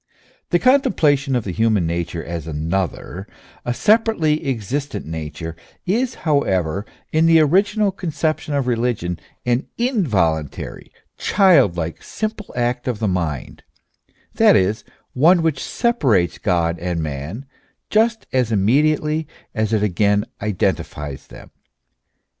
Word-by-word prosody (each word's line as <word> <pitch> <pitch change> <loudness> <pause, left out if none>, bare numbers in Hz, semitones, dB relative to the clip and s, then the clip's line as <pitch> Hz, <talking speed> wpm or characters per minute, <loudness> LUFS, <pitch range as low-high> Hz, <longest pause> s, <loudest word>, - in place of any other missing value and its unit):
The 175 - +4
contemplation 155 - +3
of 120 - 0
the 95 - -4
human 110 -2 +2
nature 85 0 -3
as 85 -2 -5
another, 90 +4 -3 0.4
a 120 - -2
se 205 - +5
parately 165 -10 0
existent 135 +4 -3
nature, 80 +1 -6 0.3
is, 235 +7 0
however, 100 - +1 0.2
in 160 +1 +3
the 165 -1 +6
original 200 +6 +3
conception 160 -4 -2
of 140 -2 0
religion 115 -8 -1 0.3
an 125 +2 0
involuntary, 105 - -1 0.3
childlike, 105 - +3
simple 215 -1 -5
act 120 +1 -1
of 125 -4 -1
the 110 - -1
mind, 85 -8 -3 0.7
that - - +5
is, 100 +4 +1 0.3
one 165 +6 +4
which 155 -4 0
separates 130 - +1
God 85 -3 0
and 85 -2 -2
man 75 - -5 0.5
just 225 +1 +2
as 125 -3 +1
immediately 150 +8 +2 0.3
as 110 0 -1
it 110 -2 +2
again 100 +1 +2 0.2
identifies 75 -8 -2
them. - - -13
120 Hz, 120 wpm, -20 LUFS, -, 0.7 s, the